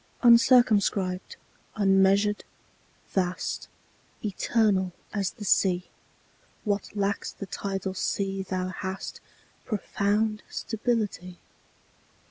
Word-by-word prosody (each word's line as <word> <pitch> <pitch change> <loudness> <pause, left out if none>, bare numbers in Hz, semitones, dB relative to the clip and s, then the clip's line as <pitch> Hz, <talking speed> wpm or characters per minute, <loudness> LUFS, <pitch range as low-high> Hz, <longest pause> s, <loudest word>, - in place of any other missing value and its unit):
UNCIRCUMSCRIBED, 220 -6 +4 0.4
unmeasured, 195 +1 +3 0.7
vast, 185 -2 -2 0.6
Eternal 200 -2 +1 0.2
as 200 -3 0
the 210 - -9
Sea; 185 -2 +3 0.8
What 205 -1 -2
lacks 200 0 -1
the 200 - -7
tidal 195 0 -3
sea 195 +1 -1
thou 185 -1 -2
hast 190 +1 -5 0.4
Profound 210 0 0
stability. 215 -6 -2
200 Hz, 80 wpm, -27 LUFS, 190-210 Hz, 0.8 s, UNCIRCUMSCRIBED